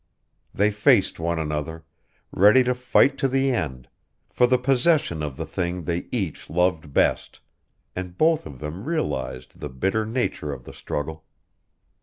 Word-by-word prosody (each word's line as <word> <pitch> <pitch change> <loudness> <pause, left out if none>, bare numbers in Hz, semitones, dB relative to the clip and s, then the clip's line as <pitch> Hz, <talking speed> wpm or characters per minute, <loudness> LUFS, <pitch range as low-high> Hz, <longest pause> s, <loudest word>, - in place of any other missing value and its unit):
They 105 +2 +2
faced 105 -4 +3
one 85 +1 -1
another, 80 +1 -4 0.5
ready 105 +7 +6
to 125 0 +1
fight 125 +2 +2
to 135 - +2
the 135 +1 +1
end, 65 - -3 0.4
for 125 - +3
the 125 +1 +3
possession 130 - +2
of 75 -3 -4
the - - -4
thing 90 0 -3
they 85 +2 -3
each 100 -10 -3
loved 85 -3 0
best, - - +1 0.6
and 90 -1 -6
both 160 - +2
of 70 -3 -10
them 75 - -7
realized 65 - -3
the 75 - -5
bitter 95 +12 -1
nature 110 - -2
of 65 -3 -9
the - - -11
struggle. 80 +2 -5
90 Hz, 155 wpm, -24 LUFS, 75-125 Hz, 0.6 s, ready